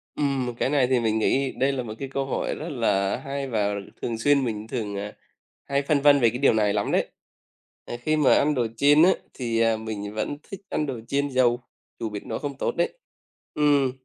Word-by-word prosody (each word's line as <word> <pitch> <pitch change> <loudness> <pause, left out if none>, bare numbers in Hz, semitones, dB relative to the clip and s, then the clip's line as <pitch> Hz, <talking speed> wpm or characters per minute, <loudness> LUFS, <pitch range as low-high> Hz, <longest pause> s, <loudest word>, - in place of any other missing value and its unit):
Ừm, 140 -3 0
một 120 - -3
cái - - 0
này 140 -4 +3
thì 130 -1 +2
mình 110 -1 +1
nghĩ 135 +4 +1
đây 135 +1 +1
là 130 -2 -3
một 110 -2 -6
cái 135 - -4
câu 135 0 -2
hỏi 135 - -2
rất 160 - -6
là 105 -8 +1
hay 135 +1 -4
và 105 -4 0 0.3
thường 115 -2 -2
xuyên 140 +3 +3
mình 110 -1 -4
thường, 105 -4 -4
à, 105 +1 -5 0.5
hay 140 0 0
phân 140 0 +1
vân 145 0 +6
về 120 -3 +5
cái 120 - -4
điều 140 - +4
này 105 -2 +2
lắm 105 -1 -1
đấy. - - +1 0.8
Ờ, 120 - -5
khi 155 +5 +1
mà 150 - +5
ăn 150 +1 +3
đồ 120 -3 +1
chiên 145 +3 +6
á 185 - +7 0.2
thì 115 -3 0
mình 105 -2 -5
vẫn 110 +7 -3
thích 195 - -7
ăn 150 - -1
đồ 130 -5 -4
chiên 140 +1 0
dầu, 125 -2 +2 0.4
dù 115 - -3
biết 105 -1 -7
nó 110 - -3
không 140 -2 -5
tốt - - -1
đấy. 170 - 0 0.6
Ừm. 145 -3 +3
130 Hz, 225 wpm, -25 LUFS, 110-140 Hz, 0.8 s, á